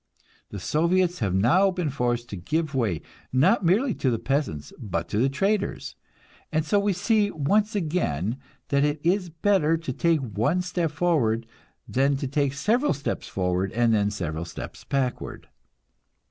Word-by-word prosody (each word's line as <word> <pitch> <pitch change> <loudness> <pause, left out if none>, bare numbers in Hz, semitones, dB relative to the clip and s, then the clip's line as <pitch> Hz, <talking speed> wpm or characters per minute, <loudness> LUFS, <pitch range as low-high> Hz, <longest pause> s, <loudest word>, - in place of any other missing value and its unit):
The 105 - -6
Soviets 170 - +1
have 100 -6 0
now 130 - +4
been 180 -5 -2
forced 120 -2 -1
to - - -5
give 155 - -2
way, 105 - 0 0.3
not 185 - +3
merely 210 +9 +3
to 130 - 0
the 115 - +1
peasants, 135 - -2
but 85 -7 -3
to 105 - 0
the 130 +4 +3
traders; 200 +8 -1 0.6
and 155 -1 0
so 205 +7 +3
we 200 0 +1
see 205 +3 +2
once 205 +8 +1
again 130 - -1 0.3
that 140 0 +3
it 145 0 0
is 180 +1 +1
better 165 -1 +2
to 160 -5 -5
take 165 +2 +2
one 125 - 0
step 175 -2 -1
forward 145 -9 +1 0.4
than 135 +2 +2
to 140 - -3
take 140 0 0
several 230 - +2
steps 140 0 -4
forward 90 0 -1
and 120 0 +3
then 105 -1 +2
several 85 -6 -3
steps - - -8
backward. 135 -3 -3
145 Hz, 160 wpm, -25 LUFS, 115-180 Hz, 0.6 s, now